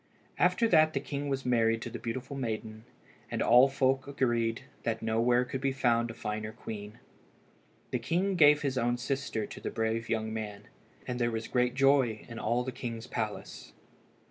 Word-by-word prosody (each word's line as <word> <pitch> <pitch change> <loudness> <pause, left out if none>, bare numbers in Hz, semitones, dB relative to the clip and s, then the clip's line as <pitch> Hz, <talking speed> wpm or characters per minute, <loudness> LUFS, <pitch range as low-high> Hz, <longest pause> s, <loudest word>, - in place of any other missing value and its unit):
After 230 - +3
that 155 -5 +5
the 135 - 0
king 145 +1 -4
was 135 -1 -2
married 115 -2 +2
to - - -6
the - - -6
beautiful 130 +4 -5
maiden, 110 -3 -4 0.4
and - - -3
all 125 +3 +6
folk 135 0 +1
agreed 120 -5 0 0.2
that 115 -1 -2
nowhere 120 +3 +2
could 130 +1 -5
be 135 -1 +1
found 120 -3 +1
a 115 - -7
finer 105 -1 -4
queen. 105 -2 -8 0.9
The 125 - 0
king 175 +10 0
gave 150 -3 +6
his 135 -2 0
own 120 +1 +1
sister 130 -3 -2
to - - -10
the - - -3
brave 115 0 -2
young 110 0 -1
man, 105 -2 -5 0.4
and 125 0 -3
there 120 -1 +2
was 115 -1 -3
great 125 0 +1
joy 135 -5 +3
in 115 -2 -7
all 120 +3 0
the 130 - -4
king's 120 -2 -6
palace. 110 -4 -5
120 Hz, 180 wpm, -30 LUFS, 115-135 Hz, 0.9 s, all